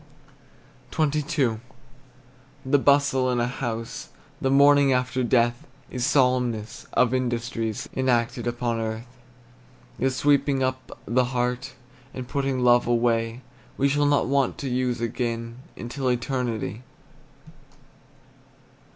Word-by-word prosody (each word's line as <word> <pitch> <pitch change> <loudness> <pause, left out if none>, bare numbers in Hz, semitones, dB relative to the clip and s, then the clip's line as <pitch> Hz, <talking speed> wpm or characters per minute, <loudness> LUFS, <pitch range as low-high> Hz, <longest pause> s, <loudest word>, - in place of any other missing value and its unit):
XXII. 150 -6 0 1.1
The 140 +2 +3
bustle 140 -2 +3
in 125 -1 +1
a 120 - +2
house 120 -2 -5 0.3
The 135 - +1
morning 140 0 +5
after 125 0 0
death 120 0 +1 0.2
Is 125 -2 -3
solemnest 125 -5 +1
of 125 0 +3
industries 120 -3 -2
Enacted 120 -2 0
upon 120 -1 -1
earth, 110 +1 -4 0.9
The 135 - +2
sweeping 140 0 +2
up 130 0 -3
the 125 +2 +2
heart, 125 +1 -2 0.4
And 130 -1 -6
putting 135 0 -1
love 120 -1 +5
away 115 0 +1 0.4
We 140 - +3
shall 145 +1 +2
not 145 0 +3
want 135 0 +1
to 140 - -4
use 125 -1 -1
again 115 0 -3 0.2
Until 130 +2 -3
eternity. 120 -4 -2
125 Hz, 110 wpm, -25 LUFS, 120-135 Hz, 1.1 s, morning